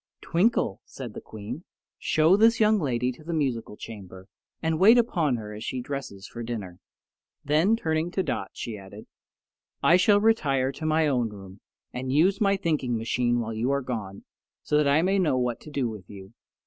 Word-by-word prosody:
"Twinkle," 175 - +1
said 125 -5 -9
the - - -8
Queen, 110 +9 -8 0.4
"show 160 +4 +4
this 225 +3 +4
young 215 -1 +4
lady 125 -5 0
to 130 +5 -14
the 165 +1 -3
musical 120 -8 -2
chamber 95 -4 -10 0.3
and 160 -1 -1
wait 220 +6 +7
upon 170 - +2
her 105 -2 -6
as 105 +1 -7
she 130 - -3
dresses 125 -7 -6
for 120 - -8
dinner." 105 -7 -6 0.7
Then, 160 +9 +3
turning 160 -5 -1
to 190 +1 -1
Dot, 95 - -3
she 110 -3 -6
added, 100 +2 -12 0.8
"I 175 - +6
shall 205 +2 +4
retire 140 -12 +2
to 155 +4 -5
my 155 0 +3
own 125 -6 +1
room 100 -1 -12 0.3
and 130 +1 -4
use 185 - +3
my 200 -1 +3
thinking 145 -9 -1
machine 120 +2 0
while 115 0 -4
you 115 +4 -1
are 140 0 +1
gone, 105 -6 -5 0.4
so - - -1
that 150 -1 +4
I 145 +3 +4
may 195 +2 +2
know 155 -8 +2
what 125 -2 -1
to - - -11
do 140 -4 -1
with 105 -5 -8
you. 100 +1 -11
130 Hz, 190 wpm, -26 LUFS, 110-165 Hz, 0.8 s, wait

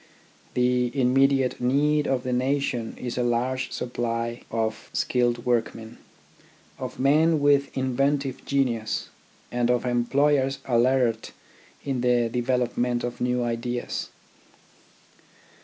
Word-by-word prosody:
The 125 0 +2
immediate 135 0 +2
need 145 +4 +2
of 130 -2 0
the 130 -1 -2
nation 130 -2 -1
is 125 0 -4
a - - +2
large 125 +2 -1
supply 115 -1 -3
of 110 -1 -3
skilled 120 -1 0
workmen, 115 -1 -2 0.8
of - - -6
men 155 +4 +3
with 140 -1 +3
inventive 135 +1 0
genius, 120 -6 -1 0.4
and 120 0 0
of 125 0 +1
employers 135 +3 +2
alert 120 -2 +1 0.5
in 135 -3 -1
the 120 -1 +2
development 125 0 0
of 120 0 -5
new 125 0 +1
ideas. 120 +1 -3
125 Hz, 105 wpm, -25 LUFS, 120-135 Hz, 0.8 s, men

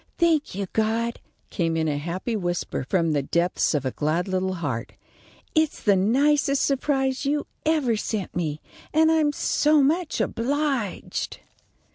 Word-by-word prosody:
"Thank 325 - +2
you, 200 0 -2
God," 225 +2 0 0.3
came 165 -3 0
in 160 0 +1
a 145 -1 -1
happy 180 +9 -3
whisper 175 -8 -2
from 165 -4 +2
the 145 -2 +1
depths 170 +3 +1
of 140 -2 -1
a 130 - 0
glad 155 +7 -1
little 185 0 -1
heart. 145 -9 -4 0.6
"It's 315 -2 +1
the 205 -2 +4
nicest 275 +8 +3
surprise 270 -1 0
you 290 +1 0 0.2
ever 295 -8 +2
sent 210 -2 -3
me, 155 -3 -2 0.3
and 320 0 +5
I'm 310 -2 +3
so 295 0 +3
much 325 +4 +1
obliged." 270 -3 -2
220 Hz, 145 wpm, -24 LUFS, 175-290 Hz, 0.6 s, and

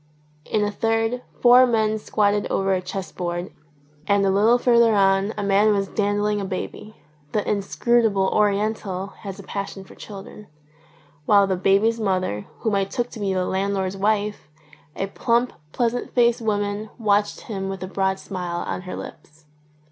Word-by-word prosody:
In 210 - 0
a 205 - 0
third 225 +3 0 0.2
four 250 +1 +7
men 220 -2 +1
squatted 205 -1 +1
over 195 0 0
a 185 - 0
chess 185 +1 -6
board, 175 0 -4 0.6
and 200 -1 +3
a 195 - +3
little 215 +5 +4
further 235 -2 +4
on 195 +1 +3
a 205 - -2
man 200 +2 +4
was 195 -1 0
dandling 205 +1 0
a - - -3
baby 195 +3 -6 0.4
(the 210 - 0
inscrutable 210 0 +1
Oriental 200 -2 0
has 195 -3 -7
a 200 - -10
passion 200 0 -5
for - - -15
children) 205 0 -10 0.8
while 200 -1 +6
the 190 -1 0
baby's 200 +5 +2
mother, 185 - -1
whom 220 -3 0
I 195 0 +2
took 240 +5 -3
to 225 - -9
be 200 -2 -1
the 185 -1 0
landlord's 190 0 -1
wife, 205 -3 -1 0.5
a 195 - -1
plump, 235 +4 0 0.2
pleasant 240 +4 -2
faced 235 -1 +3
woman, 205 -1 -1
watched 205 -2 +1
him 195 -3 -5
with 190 -1 -5
a - - -4
broad 190 0 0
smile 180 -3 -4
on - - -3
her - - -4
lips. 155 0 -11
200 Hz, 165 wpm, -23 LUFS, 195-220 Hz, 0.8 s, four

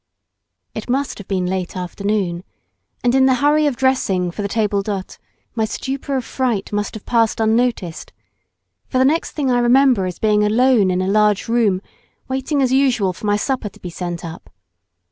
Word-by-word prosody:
It - - -7
must 270 0 -1
have 205 - -10
been 185 -2 -1
late 185 0 -3
afternoon, 185 -1 -2 0.6
and 245 0 +2
in 265 0 +5
the 260 - +4
hurry 295 +3 +3
of 280 - 0
dressing 230 -9 +1
for 205 - -6
the 200 - -1
table 205 -1 0
d'hote 195 -2 -5 0.3
my 225 - 0
stupor 270 +4 -3
of 250 - -3
fright 240 -7 -2
must 205 +2 -2
have 220 - -9
passed 230 -2 +1
unnoticed, 220 -6 0 0.8
for - - -2
the 260 - +4
next 315 +5 +1
thing 275 -4 0
I 245 - +3
remember 245 -4 +4
is 180 - -6
being 210 -1 +2
alone 225 -1 +3
in 185 0 0
a - - -2
large 210 0 +2
room, 220 -5 +1 0.4
waiting 265 +2 -1
as 255 0 +1
usual 250 -9 +2
for 210 - -6
my 205 - +3
supper 245 -1 -2
to - - -20
be 180 - -7
sent 175 0 -5
up. 165 0 -9
220 Hz, 185 wpm, -19 LUFS, 195-260 Hz, 0.8 s, in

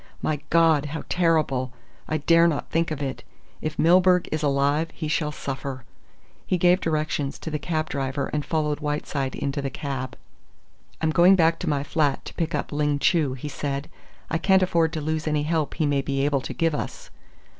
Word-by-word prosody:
My 155 -2 -1
God! 160 -3 +4
How 155 +2 -5
terrible! 155 -7 +1 0.3
I 155 - 0
dare 165 +3 +5
not 155 -4 -2
think 165 +1 +1
of 150 -2 -3
it. 135 -1 -4 0.4
If 155 0 -4
Milburgh 180 +1 +4
is 155 - -1
alive 145 +2 +1
he 155 - -4
shall 150 0 0
suffer." 135 -2 -5 0.6
He 185 - +1
gave 180 +2 +4
directions 155 -3 -1
to 160 - -6
the 150 - -2
cab 155 -2 -2
driver 140 0 -2
and 150 -1 0
followed 150 -2 -1
Whiteside 145 -2 -2
into 140 +1 -2
the 140 - -2
cab. 135 -2 -5 0.8
"I'm 160 -1 +2
going 175 +4 +6
back 165 -2 +3
to - - -2
my 140 -2 0
flat 145 -1 0
to - - -8
pick 165 -1 -2
up - - -3
Ling 145 -1 +1
Chu," 150 -3 +2
he 135 +3 -7
said. 140 0 -4 0.4
"I 160 - -1
can't 190 +2 +4
afford 165 -3 +2
to 155 - -3
lose 155 +1 -2
any 150 -1 +1
help 155 -1 -1
he 155 - 0
may 145 -1 +1
be 135 0 -1
able 145 -2 +1
to - - -6
give 165 -2 +1
us." - - -5
150 Hz, 195 wpm, -24 LUFS, 140-165 Hz, 0.8 s, going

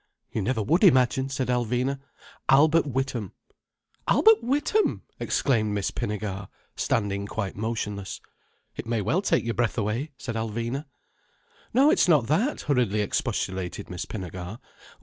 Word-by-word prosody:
"You 110 - -1
never 110 +1 0
would 165 - +2
imagine," 130 - +4
said 135 -2 -2
Alvina. 125 +3 0 0.5
"Albert 155 +4 +5
Witham." 130 -6 -2 0.7
"Albert 445 0 +6
Witham!" 295 - +1 0.2
exclaimed 110 -6 +1
Miss 100 -2 -1
Pinnegar, 100 -2 -4 0.3
standing 100 -2 -1
quite 100 -2 -3
motionless. 105 -2 -3 0.6
"It - - -6
may 115 -2 0
well 160 - +1
take 200 - +2
your 115 - -1
breath 120 0 0
away," 115 +7 -1
said 120 - -5
Alvina. 115 +5 -3 0.9
"No, 275 +6 +5
it's 350 - +4
not 150 -9 +5
that!" 200 - +1
hurriedly 120 -7 +1
expostulated 95 -3 -2
Miss 90 -1 -4
Pinnegar. 90 0 -6
120 Hz, 130 wpm, -26 LUFS, 105-140 Hz, 0.9 s, Albert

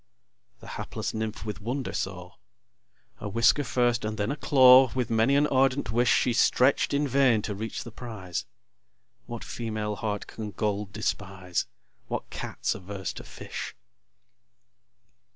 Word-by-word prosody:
The - - -12
hapless - - -4
Nymph 110 0 -4
with 105 -2 -5
wonder 125 +5 -3
saw: 90 -1 -4 0.9
A 105 - -4
whisker 115 +7 +4
first 120 -3 +1
and 110 0 -3
then 105 +4 0
a - - -1
claw, 130 -3 +7
With 125 -3 -1
many 115 +5 +3
an 145 +1 +4
ardent 135 -3 +2
wish, 120 +2 +3
She 125 - +3
stretch'd 130 +3 +3
in 145 +1 +1
vain 130 -5 +3
to 105 - -3
reach 110 +3 -5
the 120 - -9
prize. 105 -7 -6 0.8
What 120 -1 -6
female 110 -2 -3
heart 105 -1 -3
can 110 -2 -6
gold 105 0 -2
despise? 95 -3 -2 0.4
What - - -4
Cat's - - -2
averse 95 0 -5
to - - -9
fish? - - -7
110 Hz, 145 wpm, -27 LUFS, 105-125 Hz, 0.9 s, claw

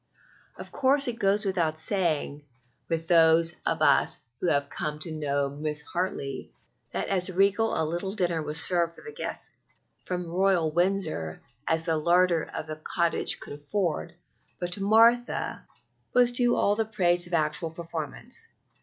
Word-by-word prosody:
Of - - -10
course 275 +1 +3
it 240 -1 -3
goes 205 0 +2
without 170 -5 0
saying 155 -4 0 0.5
with 165 -1 -2
those 165 0 +5
of - - 0
us - - +3 0.2
who - - -1
have 140 -3 +1
come 150 +1 -4
to 155 +2 -2
know 145 -2 -1
Mrs. 150 +1 -4
Hartley, 140 -7 -3 0.4
that - - -3
as 185 -1 +1
regal 200 +4 +2
a 160 - +1
little 175 +5 -3
dinner 175 -5 0
was 150 +1 -1
served 170 -2 +2
for - - -14
the 450 - -8
guests - - -4 0.5
from 180 -1 -3
Royal 175 -2 +1
Windsor 175 - -1 0.2
as 160 0 +1
the 165 -2 +1
larder 175 +1 +2
of - - -5
the 155 -1 -6
cottage 170 +1 0
could - - -7
afford; 170 +3 -3 0.4
but 175 0 -4
to 195 - -1
Martha 230 +4 +3 0.5
was 245 -1 +5
due 245 0 +3
all 205 - +2
the 225 - +1
praise 175 -5 +1
of 175 - -1
actual 155 +1 0
performance. 165 - -7
175 Hz, 160 wpm, -27 LUFS, 155-195 Hz, 0.5 s, those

